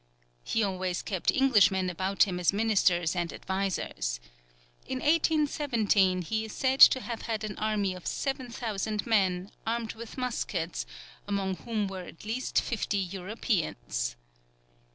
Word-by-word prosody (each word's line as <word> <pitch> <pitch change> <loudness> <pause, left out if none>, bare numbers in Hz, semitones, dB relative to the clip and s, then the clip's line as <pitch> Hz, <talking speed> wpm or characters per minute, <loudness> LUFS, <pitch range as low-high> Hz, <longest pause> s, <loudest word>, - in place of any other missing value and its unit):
He 225 - 0
always 185 -2 -2
kept 190 -4 -1
Englishmen 205 -8 +4
about 190 +2 +2
him 180 -3 -2
as 175 - +3
ministers 195 -5 +2
and 175 -2 -1
advisers. 180 - -2 0.7
In 260 - -2
1817, 275 - +2
he 220 +5 -1
is 220 - -8
said 265 0 0
to 260 - +9
have 235 -2 -5
had 220 -1 -1
an 210 -1 -4
army 210 -3 0
of 180 -1 -8
7000 230 -6 -2
men, 190 -4 +1 0.2
armed 230 0 -1
with 230 +2 -10
muskets, 200 -9 -2 0.4
among 195 -2 -1
whom 220 -4 -2
were 190 -1 -6
at 175 +1 -12
least 230 +4 0
fifty 220 -3 -2
Europeans. 180 - -2
205 Hz, 135 wpm, -29 LUFS, 185-230 Hz, 0.7 s, to